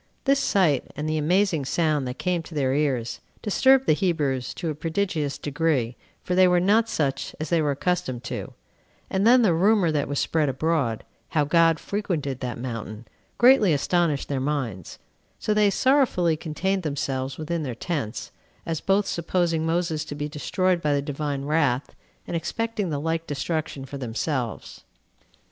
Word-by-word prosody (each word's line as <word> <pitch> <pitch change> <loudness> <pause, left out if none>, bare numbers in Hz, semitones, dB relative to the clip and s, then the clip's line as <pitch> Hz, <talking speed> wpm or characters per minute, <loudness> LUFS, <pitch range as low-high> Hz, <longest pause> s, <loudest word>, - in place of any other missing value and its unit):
This 275 0 +3
sight, 170 - +2
and 150 +1 -3
the 155 0 0
amazing 175 0 +2
sound 150 -1 0
that 125 - -5
came 180 -2 0
to 165 0 -11
their 135 -3 +1
ears, 135 -5 -1 0.2
disturbed 265 +5 +4
the - - +4
Hebrews 150 -7 -1
to 165 -3 -3
a - - -3
prodigious 160 -2 -2
degree, 145 -5 0 0.3
for 180 - -2
they 185 0 +6
were 180 0 +4
not 215 +5 +3
such 145 -11 -2
as 155 -1 -4
they 170 -2 +3
were 150 - +1
accustomed 140 -4 -1
to; 120 - -6 0.6
and 195 +3 +2
then 245 +1 +6
the 190 -6 +4
rumor 190 0 +3
that 150 -2 0
was 140 +1 -3
spread 155 -1 +1
abroad, 135 -4 0 0.3
how 150 -3 +1
God 165 +1 +4
frequented 165 -10 -3
that 125 -3 -4
mountain, 115 -2 -6 0.3
greatly 240 -8 +6
astonished 155 0 +1
their 140 -2 -1
minds, 130 - -3 0.4
so 215 - 0
they 210 -1 +4
sorrowfully 240 - +3
contained 180 +5 -2
themselves 135 -4 -3
within 160 +1 -3
their 130 -6 -4
tents, 135 -6 -4 0.3
as 165 -2 -3
both 195 +1 +2
supposing 170 -2 0
Moses 165 -2 0
to 145 - -6
be 145 0 -3
destroyed 175 +4 0
by 150 -2 +1
the 140 - +1
Divine 145 -1 -3
wrath, 145 -4 +1 0.3
and - - -4
expecting 210 +4 -2
the 145 -2 -2
like 165 +2 -2
destruction 145 -1 -3
for 140 +1 -7
themselves. 120 +1 -3
155 Hz, 165 wpm, -25 LUFS, 140-180 Hz, 0.6 s, they